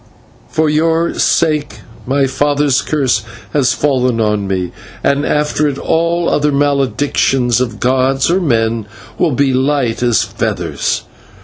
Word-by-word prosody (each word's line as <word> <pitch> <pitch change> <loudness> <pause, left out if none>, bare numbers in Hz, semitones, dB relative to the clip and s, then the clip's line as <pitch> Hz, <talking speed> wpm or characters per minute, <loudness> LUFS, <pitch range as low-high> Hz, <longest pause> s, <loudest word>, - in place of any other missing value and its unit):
For 160 0 +1
your 165 +2 +1
sake 155 -2 +1 0.3
my 135 +1 +2
father's 145 0 +1
curse 135 -8 0 0.3
has 130 -5 +2
fallen 130 -5 +1
on 105 -2 0
me, 95 -2 -2 0.3
and 140 +1 +1
after 150 0 +1
it 140 -2 -2
all 170 +2 0
other 150 0 +1
maledictions 135 -3 +1
of 115 -4 -3
gods 130 +1 +1
or 185 +2 +2
men 115 - 0 0.3
will 165 -5 +2
be 135 0 +1
light 130 -3 0
as 120 -2 +2
feathers. - - -2
140 Hz, 130 wpm, -15 LUFS, 125-150 Hz, 0.3 s, my